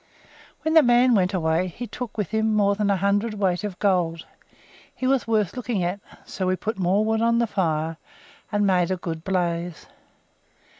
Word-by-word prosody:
When 315 - 0
the 320 - +8
man 245 -1 +4
went 185 -3 +2
away 170 -1 0
he 225 +7 -7
took 240 -1 -7
with 210 -5 -2
him 220 0 +1
more 200 -1 +3
than 205 0 -1
a 200 - +2
hundredweight 200 -1 0
of 200 -3 -4
gold. 175 -5 0 0.7
He 255 - -4
was 265 -2 +1
worth 215 -3 +1
looking 230 -6 -2
at, 180 +3 -2 0.3
so 185 - -4
we 185 - +2
put 215 +2 -4
more 190 +4 +2
wood 220 0 0
on 230 0 +3
the 235 - +2
fire, 165 -6 -1 0.5
and 205 -1 +1
made 180 -3 +2
a 185 - -1
good 165 -2 -5
blaze. 175 -3 -2
200 Hz, 185 wpm, -24 LUFS, 180-220 Hz, 0.7 s, the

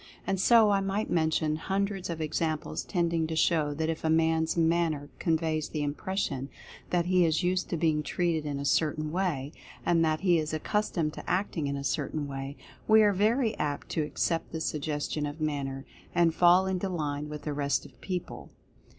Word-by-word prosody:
And 195 -1 -1
so 220 +1 +6
I 200 - +3
might 195 +2 -2
mention 160 -2 +1
hun 195 +5 0
dreds 195 -2 -5
of 165 -1 -4
examples 155 +1 -2
tending 170 -3 0
to 160 - -3
show 155 -3 +2
that 160 +1 -1
if 165 0 -3
a 160 - +1
man's 160 0 +2
manner 165 -3 +1
conveys 160 -2 0
the 150 -2 -2
impression 145 -2 -2 0.4
that 175 -1 +1
he 180 0 +4
is 160 +2 +2
used 180 +1 0
to 170 - -1
being 155 -2 +2
treated 165 +1 -1
in 145 -2 -3
a 140 - -4
certain 155 +1 +1
way, 160 -6 -1 0.3
and 165 -1 +3
that 155 -1 +1
he 175 -3 +4
is 155 0 -3
accus 210 +7 -1
tomed 155 -4 -1
to - - -8
acting 180 -5 0
in 140 0 -2
a 140 - -5
certain 145 +1 -2
way, 135 +1 -6 0.3
we 220 0 +7
are 205 -1 +4
very 220 +4 +2
.apt 145 -1 -2
to 160 - 0
accept 165 +2 -1
the 160 - -4
Suggestion 150 -1 -2
of 145 +2 -7
Manner, 140 -3 -2 0.3
and 170 -2 +4
fall 180 +2 +5
into 190 0 -1
line 150 -4 -3
with 150 -1 -7
the 150 - -3
rest 140 -1 0
of - - -16
people. 180 -2 -5
160 Hz, 195 wpm, -29 LUFS, 150-180 Hz, 0.4 s, we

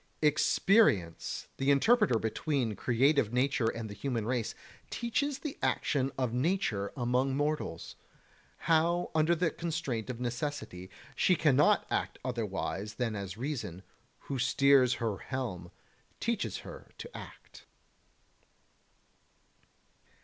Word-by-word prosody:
34. - - +7
Experience, 155 - +2
the 135 +1 0
interpreter 210 - +4
between 115 +1 -1
creative 125 +1 +2
nature 125 -1 +1
and 115 0 -3
the 105 - -7
human 115 +1 -2
race, 120 -1 -1 0.3
teaches 265 +4 -1
the 285 0 -6
action 135 -2 +1
of 125 -3 -1
nature 125 - 0
among 130 +2 +1
mortals: 145 - -2 0.7
how 170 +2 +2
under 160 +2 +3
the 165 -1 +1
constraint 155 -9 -3
of 125 -2 -4
necessity 120 - -4 0.3
she 185 - +3
cannot 150 -3 +4
act - - -1
otherwise 105 -3 -3
than 115 -2 -1
as 100 -1 -5
reason, 120 - -4 0.4
who 135 -2 -4
steers 135 -1 +4
her 110 -4 -2
helm, 105 -10 -4 0.5
teaches 230 -2 -1
her - - -10
to - - -7
act. - - -12
130 Hz, 115 wpm, -31 LUFS, 115-155 Hz, 0.7 s, 34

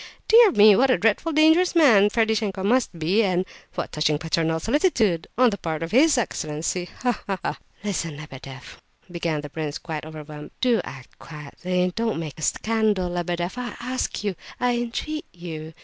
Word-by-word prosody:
Dear 455 -1 +7
me! 210 0 +7
what 265 +6 +3
a 255 - +4
dreadfully 225 +9 +1
dangerous 320 +4 +4
man 225 -11 +6
Ferdishenko 220 -3 0
must 230 -3 +1
be, 175 +7 +2
and 185 -3 +1 0.3
what - - -4
touching 150 0 +1
paternal 160 0 -1
solicitude, 225 - +1
on 250 -1 +5
the 200 - -5
part 160 -1 -3
of 165 - -5
his 285 +5 +5
excellency, 170 -4 -2
ha! 245 -3 0
ha! 195 -1 -1
ha!" - - -3 0.2
"Listen, 170 -7 -3
Lebedeff," 135 -3 -11 0.3
began 165 -3 -2
the 145 - -8
prince, 155 -2 -4
quite 160 -3 -6
overwhelmed; 150 -1 -9
"do 245 -3 +2
act 130 -2 -11
quietly—don't 180 +8 -3
make 155 -2 -6
a - - -8
scandal, 215 -1 0
Lebedeff, 175 +4 -3
I 245 -1 -5
ask 255 -2 -3
you—I 225 +5 -2
entreat 240 +6 -4
you! 160 -3 -8
185 Hz, 165 wpm, -24 LUFS, 160-235 Hz, 0.3 s, Dear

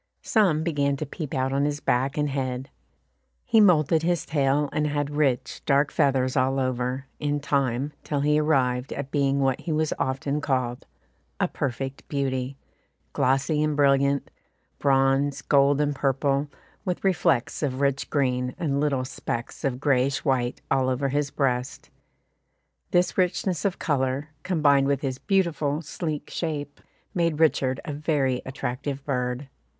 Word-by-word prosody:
Some 180 -9 +2
began 145 -4 0
to 155 - -3
peep 150 0 -6
out 130 0 0
of 140 +1 +1
his 145 0 -1
back 135 +1 0
and 150 -1 0
head. 130 -1 -3 0.7
He 225 -2 +5
moulted 160 -5 +4
his 170 -1 0
tail, 145 0 +1
and 150 0 +1
had 145 -1 -1
rich, 145 -4 0
dark 140 +1 +2
feathers 135 -4 +2
all 135 0 +2
over, 130 +1 -1
in 145 0 0
time, 140 -1 0
till 145 -2 -1
he 150 +1 +3
arrived 130 -4 +1
at 140 -1 -5
being 140 -1 +1
what 135 -1 +1
he 170 - -4
was 155 0 +1
often 140 +3 -1
called, 125 -4 -1 0.5
"a - - +2
perfect 135 +1 -4
beauty" 135 -1 -2 0.6
glossy 135 +4 +1
and 155 -1 +1
brilliant, 140 0 +3 0.5
bronze 135 0 +2
gold 140 0 +4
and 145 0 +1
purple, 140 +1 0 0.4
with 180 -3 -3
reflets 170 -9 +1
of 135 -3 -1
rich 140 -1 0
green, 125 -3 0
and 140 -4 -1
little 140 -3 0
specks 120 -2 -5
of 130 -2 -1
greyish 135 0 +1
white 125 -3 0
all 130 -1 +2
over 135 +2 0
his 145 +1 0
breast; 125 -3 -2 1.0
this 180 +2 +2
richness 180 -1 0
of 195 - 0
colour, 135 -1 -1
combined 150 -6 +3
with 140 -1 +1
his 130 -2 -3
beautiful 170 -7 +1
sleek 155 -1 -4
shape, 145 -4 -4 0.3
made 165 -3 0
Richard 135 -4 +2
a 150 - -4
very 140 -4 0
attractive 135 +2 -4
bird. 125 0 -2
140 Hz, 150 wpm, -25 LUFS, 130-150 Hz, 1.0 s, He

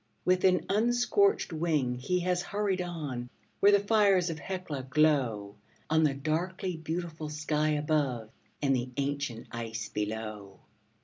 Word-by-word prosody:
With 185 0 +3
an 180 -1 +3
unscorched 240 - +2
wing 155 -6 +1
he 140 +9 -1
has 180 0 +1
hurried 200 -1 -1
on, 145 -9 -4 0.3
where 200 - +6
the 200 - +6
fires 200 -4 +3
of 160 - -6
Hecla 180 -6 -4
glow 125 -9 +2 0.3
On 160 0 +4
the 145 -3 +2
darkly 175 +6 -2
beautiful 160 -1 -4
sky 150 0 0
above 145 -7 0 0.3
and 135 -1 +3
the 125 0 -2
ancient 140 -4 -2
ice 115 -1 -5
below. 105 -2 -4
155 Hz, 135 wpm, -30 LUFS, 125-180 Hz, 0.3 s, where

